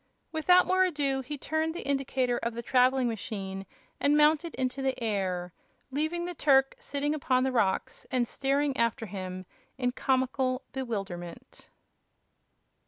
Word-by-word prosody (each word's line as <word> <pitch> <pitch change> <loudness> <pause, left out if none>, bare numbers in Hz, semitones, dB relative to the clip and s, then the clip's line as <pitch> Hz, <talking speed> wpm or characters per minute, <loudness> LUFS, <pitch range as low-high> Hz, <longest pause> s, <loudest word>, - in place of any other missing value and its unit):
Without 360 +3 +5
more 375 0 +3
ado, 285 -6 0
he 285 +3 -5
turned 315 +3 -1
the - - -6
indicator 265 -3 0
of 235 0 -3
the 235 - -4
traveling 255 +1 +3
machine 195 -3 -5 0.3
and 290 +1 +3
mounted 310 +2 +3
into 260 +1 -2
the 265 -1 -1
air, 185 -6 -2 0.4
leaving 315 +5 -1
the 355 - -4
Turk 270 -4 +4
sitting 290 +1 -2
upon 260 -4 +1
the 265 - +1
rocks 205 -6 0
and 250 -3 +1
staring 275 +2 0
after 230 -1 0
him 185 -2 -6 0.3
in 250 -1 0
comical 260 0 0
bewilderment. 195 -10 -6
260 Hz, 140 wpm, -29 LUFS, 230-290 Hz, 0.4 s, Without